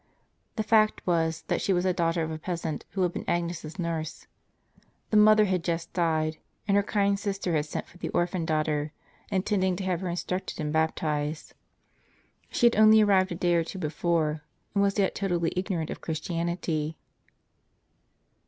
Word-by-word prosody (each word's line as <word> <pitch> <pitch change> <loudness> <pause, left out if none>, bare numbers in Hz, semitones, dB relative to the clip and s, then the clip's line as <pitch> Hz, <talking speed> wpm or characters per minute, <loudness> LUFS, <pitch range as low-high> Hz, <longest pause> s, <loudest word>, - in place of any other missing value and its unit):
The 220 - -1
fact 215 0 +3
was, 165 -2 0
that - - -1
she 195 - +1
was 175 0 +1
the 185 -1 +2
daughter 165 -1 0
of 160 - -3
a 155 - -5
peasant 165 -2 -4
who 190 - 0
had 175 -1 0
been - - -4
Agnes' 170 -1 -1
s 155 +4 -8
nurse. 165 -2 -4 0.9
The 215 - +4
mother 215 0 +7
had 185 -3 0
just 170 -1 -3
died, 160 -2 0 0.3
and 200 - +3
her 205 - +5
kind 200 -1 +1
sister 195 -3 -2
had 150 -1 0
sent - - -4
for 175 - -18
the - - -3
orphan 175 0 0
daughter, 155 -1 -1 0.4
intending 190 -1 +1
to 190 - -5
have 185 -2 -1
her 185 - -2
instructed 180 +2 -3
and 150 -1 -2
bap 160 0 +2
tized. 150 0 -3 1.0
She - - +1
had 235 - +5
only 215 0 +7
arrived 190 -2 +3
a - - -2
day 175 0 +1
or 170 -1 +3
two 165 - -8
before, 155 -2 0 0.3
and 200 - +2
was 200 0 +2
yet 195 -2 +2
totally 175 -4 -1
ignorant 180 -4 -2
of - - -7
Christianity. 165 -1 -2
175 Hz, 180 wpm, -27 LUFS, 160-195 Hz, 1.0 s, mother